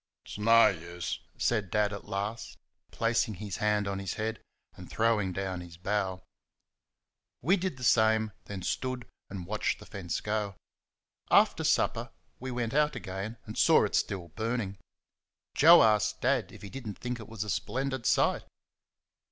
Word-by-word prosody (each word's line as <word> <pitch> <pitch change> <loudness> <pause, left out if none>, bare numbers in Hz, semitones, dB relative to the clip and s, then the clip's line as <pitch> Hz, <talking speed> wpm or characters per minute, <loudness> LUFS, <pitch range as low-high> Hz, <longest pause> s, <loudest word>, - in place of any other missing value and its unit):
"It's - - -8
no 115 +2 +6
use," 85 0 -5 0.2
said 105 -5 0
Dad 105 +1 +1
at 100 - -7
last, 100 +4 -4 0.3
placing 115 -2 0
his 100 0 -5
hand 105 -2 +1
on 100 0 -2
his 95 -1 -4
head, 110 +1 -3 0.3
and - - -12
throwing 110 -4 +1
down 95 -1 -3
his 85 -1 -11
bough. 95 0 -2 1.2
We 175 +9 +4
did 185 -7 -3
the 125 - -9
same, 110 -2 +3
then 95 -3 -6
stood 130 +2 -3 0.2
and 95 -3 -6
watched 105 +3 -1
the - - -13
fence 90 -4 -4
go. 105 -2 -2 0.7
After - - +4
supper - - +1 0.3
we 130 - -5
went 120 -2 -2
out 150 +1 +2
again 95 +4 -5
and 105 - -8
saw - - +5
it - - -4
still 90 -4 -1
burning. 110 0 -3 0.7
Joe 165 +4 +8
asked 105 -1 +2
Dad 125 -8 +1
if - - -13
he 100 - -8
did 135 -4 -7
n't 105 - -6
think 125 -1 -4
it 110 - -10
was 110 -2 -4
a 105 - -7
splendid 130 -1 -2
sight? - - +2
105 Hz, 165 wpm, -30 LUFS, 95-115 Hz, 1.2 s, Joe